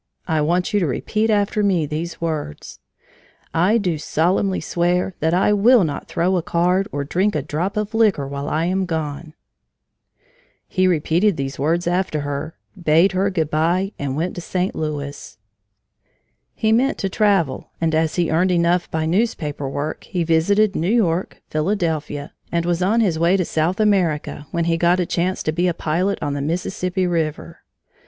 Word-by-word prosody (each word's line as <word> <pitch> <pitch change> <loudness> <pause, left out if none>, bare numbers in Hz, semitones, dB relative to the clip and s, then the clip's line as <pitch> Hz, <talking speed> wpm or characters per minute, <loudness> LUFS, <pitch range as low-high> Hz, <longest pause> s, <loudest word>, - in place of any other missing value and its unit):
I 160 -3 +1
want 175 +6 0
you 205 - +3
to 175 - +1
repeat 215 - -1
after 210 0 +1
me 185 -6 +2
these 160 +4 -4
words 155 - -4 0.7
'I 185 +7 +3
do 180 -7 -1
solemnly 185 +5 +1
swear 180 +2 0
that 160 +2 +1
I 195 +3 +3
will 220 +2 +5
not 145 -4 -3
throw 180 +2 +1
a - - 0
card 180 +4 +1
or 145 0 -2
drink 190 +8 0
a 150 - -1
drop 175 +8 -3
of 210 0 -2
liquor 210 -11 +2
while 140 +1 -4
I 160 +2 0
am 185 +1 0
gone!'" 155 -1 -4 1.3
He 185 0 +1
repeated 175 +3 +2
these 135 -1 -4
words 165 +5 +1
after 175 -3 0
her, 145 +3 -4 0.2
bade 170 +1 +3
her 190 +1 +1
good 160 -5 -1
by, 175 +5 +1
and 140 -2 -2
went 165 +5 -2
to 175 - -6
St. 180 +2 -2
Louis. 145 -7 -5 1.2
He 220 - +1
meant 255 +5 +2
to 195 - -1
travel, 195 - +1
and 165 -1 0
as 160 0 +1
he 175 -3 +1
earned 175 +4 +2
enough 175 0 +2
by 160 0 -1
newspaper 160 - -1
work, 145 +3 -4
he 175 -2 -2
visited 195 +6 +2
New 170 +4 0
York, 190 -6 0
Philadelphia, 155 -4 -2 0.2
and 170 0 0
was 175 0 0
on 215 +6 +3
his 175 -7 +1
way 170 +3 +3
to 180 - 0
South 160 +6 0
America 175 -8 +1
when 170 -1 -1
he 165 0 +1
got 175 +2 +3
a 180 - +1
chance 180 +2 -1
to 155 - 0
be 175 +3 0
a 175 - 0
pilot 180 +6 0
on 145 -1 -1
the 140 - -3
Mississippi 180 +4 -1
River. 165 -1 -2
170 Hz, 175 wpm, -21 LUFS, 155-190 Hz, 1.3 s, will